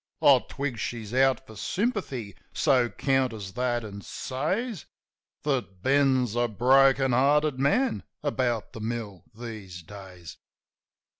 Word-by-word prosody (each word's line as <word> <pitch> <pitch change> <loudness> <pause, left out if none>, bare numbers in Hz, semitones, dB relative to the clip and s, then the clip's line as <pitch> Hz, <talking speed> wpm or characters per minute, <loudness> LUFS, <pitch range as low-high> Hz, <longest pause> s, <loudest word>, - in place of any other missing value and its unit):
I - - +7
twig 135 -5 -3
she's 110 -1 -4
out 135 0 +3
for 110 - -13
sympathy; 140 - -2 0.2
so 125 -3 +3
counters 125 -9 -1
that, 120 -1 -1
an' 100 -1 -8
says 180 - -3 0.6
That 120 -10 -2
Ben's 130 -4 +3
a 120 0 +2
broken 135 +4 +4
hearted 140 +2 +3
man 230 - +2 0.2
about 125 -6 -1
the - - -8
mill 110 -5 -5
these 105 -7 -8
days. 90 -2 -11
125 Hz, 120 wpm, -27 LUFS, 110-135 Hz, 0.6 s, I